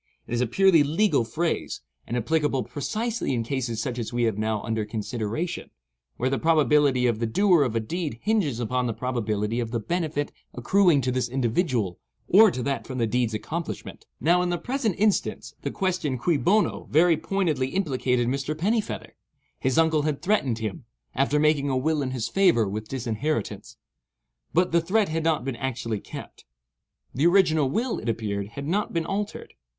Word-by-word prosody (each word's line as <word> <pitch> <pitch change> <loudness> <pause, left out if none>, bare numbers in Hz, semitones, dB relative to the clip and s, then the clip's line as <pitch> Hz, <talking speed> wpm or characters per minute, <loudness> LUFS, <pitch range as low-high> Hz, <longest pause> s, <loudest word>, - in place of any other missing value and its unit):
It - - -7
is 120 - +1
a 125 - +1
purely 190 +5 +5
legal 150 - +2
phrase, 160 +9 -2 0.3
and 120 - -2
applicable 145 +1 +1
precisely 220 - -2
in 115 - -1
cases 120 -2 -2
such 125 -1 -3
as 115 - -4
we 120 0 0
have 110 -3 +1
now 110 0 -1
under 110 -1 -1
consideration, 115 - -4 0.5
where 125 - 0
the 135 - 0
probability 150 -5 +3
of 115 -3 +1
the 115 - 0
doer 180 - +4
of 125 -5 0
a - - +3
deed 150 +2 -4
hinges 195 - +1
upon 125 +1 0
the 115 - -2
probability 115 -3 -1
of 115 -2 -2
the 115 0 -2
benefit 155 +1 -2 0.2
accruing 170 - +3
to 130 0 0
this 125 -1 -1
individual 120 - 0 0.3
or 215 +4 +7
to 125 -8 -4
that 140 +1 -2
from 130 - -5
the 115 - +2
deed's 115 0 0
accomplishment. 165 +9 -5
Now 175 +3 +3
in 180 - 0
the 175 - 0
present 245 -3 -1
instance, 210 0 0
the - - -2
question 180 -8 -1
cui 165 +7 +1
bono? 200 +8 +1
very 165 +2 +5
pointedly 160 -9 0
implicated 130 -7 0
Mr. 140 +4 -2
Pennifeather. 210 +6 -2 0.4
His 130 -1 0
uncle 160 -2 +4
had 150 -1 -2
threatened 175 - +1
him, 115 +5 -5 0.3
after 140 +3 +1
making 150 -2 +2
a 130 - +1
will 155 +3 +1
in 135 - -2
his 125 -3 -2
favour, 170 - +3
with 105 +2 -4
disinheritance. 125 +1 -3 0.7
But 180 +2 +2
the 170 0 +3
threat 195 +4 +1
had 160 0 -1
not 160 -6 +1
been 135 -3 -3
actually 115 -4 -3
kept; - - -10 0.7
the 145 +6 +3
original 165 -6 +4
will, 230 - -1
it 115 - -4
appeared, 105 -3 -2
had 140 +6 -7
not 205 +6 -1
been 165 -1 0
altered. 205 +3 -4
140 Hz, 180 wpm, -25 LUFS, 120-170 Hz, 0.7 s, or